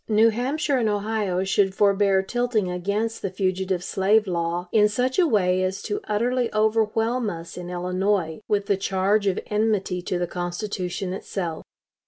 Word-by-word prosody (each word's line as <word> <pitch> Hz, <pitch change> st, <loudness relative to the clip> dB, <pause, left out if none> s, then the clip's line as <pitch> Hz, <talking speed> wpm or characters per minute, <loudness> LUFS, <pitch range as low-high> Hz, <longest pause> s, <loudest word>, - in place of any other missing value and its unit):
New 220 Hz, +1 st, +5 dB
Hampshire 270 Hz, +5 st, 0 dB
and 225 Hz, -3 st, +1 dB
Ohio 205 Hz, -3 st, -1 dB
should 195 Hz, 0 st, +1 dB
forbear 200 Hz, -1 st, +3 dB
tilting 230 Hz, -3 st, 0 dB
against 200 Hz, +5 st, -2 dB
the 195 Hz, -, -2 dB
fugitive 185 Hz, -1 st, -1 dB
slave 205 Hz, +4 st, +2 dB
law 175 Hz, -1 st, -2 dB
in 210 Hz, -1 st, +4 dB
such 255 Hz, -, 0 dB
way 190 Hz, -, +3 dB
as 185 Hz, +1 st, -2 dB
to 205 Hz, -, -3 dB
utterly 240 Hz, +3 st, 0 dB
overwhelm 225 Hz, +2 st, +1 dB
us 165 Hz, -2 st, -7 dB
in 180 Hz, 0 st, -7 dB
Illinois 180 Hz, 0 st, -1 dB
with 205 Hz, -1 st, +1 dB
the 200 Hz, -2 st, +1 dB
charge 195 Hz, +2 st, +1 dB
of 195 Hz, -, +1 dB
enmity 210 Hz, -4 st, 0 dB
to 180 Hz, 0 st, -2 dB
the 175 Hz, -, 0 dB
Constitution 180 Hz, +1 st, -4 dB
itself. 175 Hz, -4 st, -4 dB
200 Hz, 155 wpm, -24 LUFS, 185-220 Hz, -, New